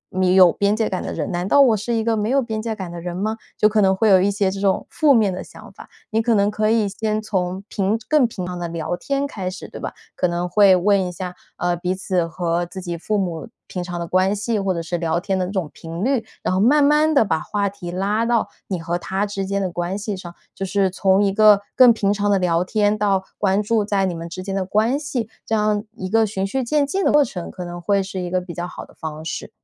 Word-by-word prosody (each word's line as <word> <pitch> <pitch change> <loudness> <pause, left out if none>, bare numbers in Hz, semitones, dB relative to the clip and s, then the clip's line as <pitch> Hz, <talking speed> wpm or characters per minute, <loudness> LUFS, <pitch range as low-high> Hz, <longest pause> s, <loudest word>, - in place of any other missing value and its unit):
你 185 0 +3
有 185 -2 +8
边 200 +3 +1
界 220 0 0
感 185 - -2
的 - - -5
人， 150 - -3
难 175 +1 -2
道 280 +7 +5
我 245 -5 +5
是 220 +3 -3
一 225 - 0
个 230 0 +1
没 210 0 -1
有 275 +2 +3
边 220 -4 -3
界 225 -1 -3
感 190 -4 -6
的 170 0 -7
人 175 0 -5
吗？” 215 +3 -2 0.2
就 215 - +5
可 215 0 +2
能 190 -1 +4
会 215 +3 +2
有 190 -2 +6
一 195 - +3
些 200 -1 0
这 195 - -5
种 195 -1 +1
负 305 -2 +3
面 215 -6 +3
的 180 - -5
想 - - -14
法， - - -13 0.2
你 220 - +2
可 230 0 +2
能 200 0 +2
可 215 0 0
以 220 -2 +2
先 215 +2 -2
从 190 -3 -2
平 200 +2 0
更 300 -5 +4
平 190 -5 -6
常 180 0 -5
的 175 - -3
聊 165 +1 -3
天 275 +10 -2
开 195 -10 -4
始 185 - -8
对 - - -10
吧？ - - -4 0.2
可 180 - +1
能 175 +1 -2
会 195 +1 +5
问 195 +2 +3
一 180 - -5
下， 180 0 -6 0.2
呃， 175 0 0
彼 180 +2 -2
此 185 -3 -1
和 170 +1 -1
自 185 +2 -8
己 175 -2 -4
父 210 +6 -2
母 175 -6 -3 0.2
平 180 - -5
常 175 -1 -5
的 170 - -3
关 185 +3 +2
系 210 +2 -1
或 195 -1 0
者 170 - -3
是 175 +2 -2
聊 165 0 0
天 190 +1 -1
的 180 - -1
这 - - -6
种 185 -7 -3
频 165 +3 -6
率， 260 -2 +1 0.2
然 - - 0
后 185 - +1
慢 290 +6 +5
慢 300 +2 +4
地 250 - +5
把 160 -5 0
话 205 +4 -1
题 190 -3 -8
拉 200 +5 0
到 230 -1 +1 0.2
你 185 -3 -3
和 170 +1 -2
他 190 +3 -2
之 200 -2 -4
间 200 0 -1
的 185 - -2
关 175 +2 -3
系 210 0 -4
上， 175 -2 -9 0.2
就 - - -6
是 195 0 +1
从 190 +1 +3
一 200 - +2
个 210 -1 +6
更 250 -2 +8
平 205 -3 +1
常 205 0 0
的 200 - +4
聊 175 -2 +1
天 205 +2 +1
到 195 -2 +1 0.2
关 200 +1 +2
注 220 0 +1
在 200 -1 +1
你 185 - -1
们 165 0 -6
之 185 +2 -7
间 195 0 -4
的 195 -1 0
关 220 +8 +1
系， 265 -7 -3 0.2
这 225 - -1
样 210 -1 +1
一 185 - -4
个 225 +3 +3
循 195 -2 -2
序 260 +7 -2
渐 290 +4 +1
进 380 +8 -1
的 - - +3
过 295 0 +5
程， 180 -6 -6
可 180 - -7
能 175 0 -7
会 200 +2 +1
是 190 0 -6
一 180 - -4
个 185 +1 +1
比 180 -1 -8
较 175 0 -4
好 - - -9
的 - - -20
方 155 -1 -7
式。 165 - -5
195 Hz, 295 characters per minute, -21 LUFS, 180-215 Hz, 0.2 s, 有